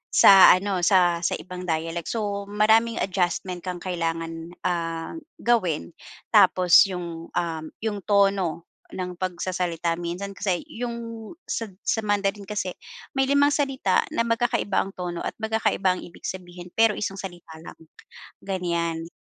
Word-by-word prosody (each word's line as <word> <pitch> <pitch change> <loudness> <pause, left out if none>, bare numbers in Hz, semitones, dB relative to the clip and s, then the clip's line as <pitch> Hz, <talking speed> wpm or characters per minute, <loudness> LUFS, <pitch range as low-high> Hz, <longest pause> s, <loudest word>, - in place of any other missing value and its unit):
sa 195 -1 +9
ano, 190 0 -1
sa 175 -2 +4
sa - - +1
ibang 180 0 -8
dialect. 165 0 -2
So, 205 -3 -2
maraming 220 +3 +3
adjustment 180 -1 -1
kang 180 -1 -4
kailangan, 165 -2 -3 0.2
ah, 165 - -3 0.2
gawin 180 - 0 0.4
tapos 180 -2 +7
yung, 170 -2 -6
um, 165 -2 -2 0.2
yung 210 -3 -3
tono 195 -5 +1 0.3
ng 180 -1 -5
pagsasalita, 175 -2 -2
minsan 175 +3 -4
kasi 185 -4 0
yung 230 -1 -6 0.2
sa 230 - -2 0.2
sa 225 - 0
Mandarin 200 0 0
kasi, 195 -2 -3 0.5
may 270 - +4
limang 285 +1 +4
salita 270 -9 +1
na - - +1
magkakaiba 230 -3 0
ang 195 - 0
tono 175 -1 -5
at - - -3
magkakaiba 220 -4 +1
ang - - -7
ibig 175 - -15
sabihin. 180 -1 -7
Pero 225 -1 +5
isang 195 -1 -4
salita 175 -4 -9
lang, 165 - -11 0.7
ganiyan. 170 -3 -2
185 Hz, 135 wpm, -25 LUFS, 170-210 Hz, 0.7 s, sa